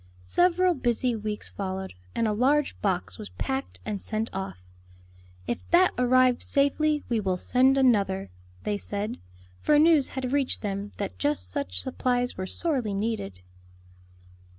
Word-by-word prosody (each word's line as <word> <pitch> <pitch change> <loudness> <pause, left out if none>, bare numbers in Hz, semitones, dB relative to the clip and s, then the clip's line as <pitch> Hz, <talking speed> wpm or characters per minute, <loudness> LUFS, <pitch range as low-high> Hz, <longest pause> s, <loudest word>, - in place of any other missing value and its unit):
Several 360 - +3
busy 245 -3 0
weeks 210 -1 -4
followed, 190 -1 -4 0.2
and 230 - +1
a 210 - +1
large 275 +6 +2
box 180 - -1
was 100 - -7
packed 95 +1 -4
and 200 -2 -3
sent 220 +1 -3
off. 190 - -6 0.8
"If 120 - -2
that 360 +2 +5
arrives 250 0 +3
safely 295 +2 +1
we 235 -2 +1
will 190 -3 0
send 260 +7 +3
another," 200 - +2 0.3
they 205 -1 -1
said; 205 +3 -4 0.4
for 300 - +3
news 310 -2 +5
had 260 0 -2
reached 280 -4 +2
them 200 0 -3
that 200 -2 -5 0.2
such 285 -1 -3
supplies 245 -1 -1
were 185 0 -4
sorely 255 - -1
needed. 195 - -3
230 Hz, 140 wpm, -27 LUFS, 195-270 Hz, 0.8 s, that